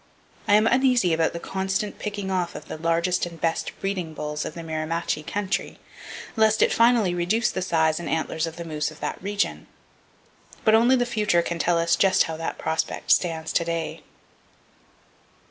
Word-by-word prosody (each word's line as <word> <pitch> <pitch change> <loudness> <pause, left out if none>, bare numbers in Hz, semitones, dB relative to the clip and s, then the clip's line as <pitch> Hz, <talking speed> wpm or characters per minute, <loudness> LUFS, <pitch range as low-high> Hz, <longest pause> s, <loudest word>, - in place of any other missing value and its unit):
I 205 - +6
am 215 +1 +4
uneasy 250 -8 +3
about 160 0 +2
the 170 - -4
constant 190 +3 -3
picking 205 -2 -4
off 180 -2 -1
of - - -8
the - - -7
largest 170 +2 +1
and 170 -1 -11
best 165 -1 -1
breeding 185 -5 -3
bulls 150 0 -4
of - - -6
the 170 - -7
Mirimachi 160 0 -2
country, 195 -1 -2 0.6
lest 220 -1 +4
it - - +3
finally 230 -5 +4
reduce 180 +7 +1
the 190 - -3
size 160 -3 +1
and 170 - -5
antlers 160 0 -1
of 165 - -7
the 170 0 -7
moose 155 -2 -2
of 155 - -14
that - - -4
region; 205 +1 -2 1.0
but 220 - +5
only 235 +4 +5
the 245 -1 +1
future 210 -7 +1
can 170 0 -4
tell 175 0 +2
us 170 0 +2
just 190 -1 +4
how 160 - -4
that 165 - -4
prospect 160 - -2
stands 160 -3 +1
to 170 - +2
day. 165 -1 -3
175 Hz, 180 wpm, -24 LUFS, 165-205 Hz, 1.0 s, I